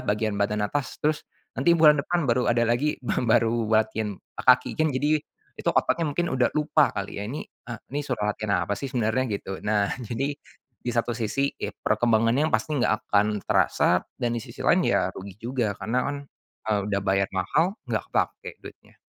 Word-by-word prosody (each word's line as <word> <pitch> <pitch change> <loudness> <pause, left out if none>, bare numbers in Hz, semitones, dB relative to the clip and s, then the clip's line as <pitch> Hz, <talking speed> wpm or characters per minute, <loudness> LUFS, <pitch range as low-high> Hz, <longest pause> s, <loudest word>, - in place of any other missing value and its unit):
bagian 105 0 0
badan 105 +1 0
atas, 145 +5 -2
terus 150 0 0 0.3
nanti 170 - +4
bulan 150 -2 +6
depan 175 +4 -1
baru 125 -1 +1
ada 120 0 +3
lagi 120 +6 +1
ba 125 - -1
baru 115 -1 +2
latihan 110 -1 +1 0.2
kaki 125 0 +4
kan, 155 - +3
jadi 150 +4 +2 0.4
itu - - 0
otaknya 165 -2 +2
mungkin 175 +2 0
udah 130 -2 +2
lupa 150 0 +2
kali, 100 0 -4
ya. 105 - -4
Ini, 135 +7 -4
eee, 120 -2 -10
ini 145 - -1
suruh 125 -5 -2
latihan 105 -3 0
apa 100 - -1
sih 140 - -4
sebenarnya, 125 0 0
gitu. 95 -1 -5
Nah, 105 -1 +1
jadi 125 +5 -2 0.5
di 125 - -4
satu 120 0 0
sisi, 130 +5 0
ya - - -4
perkembangannya 115 +5 +2
pasti 140 +7 0
nggak 120 - +3 0.2
akan 105 0 +2
terasa - - +3 0.2
dan 120 -1 -1
di - - -2
sisi - - -9
lain - - +3
ya - - +2
rugi 95 -1 -9
juga 115 -3 -1
karena 125 +3 -1
kan, 145 - -3 0.5
eee, 105 - +2
udah 100 -1 0
bayar 95 0 +1
mahal. 160 - +1 0.2
Nggak - - -1
kepake - - -1
duitnya. - - -14
120 Hz, 185 wpm, -25 LUFS, 105-140 Hz, 0.5 s, bulan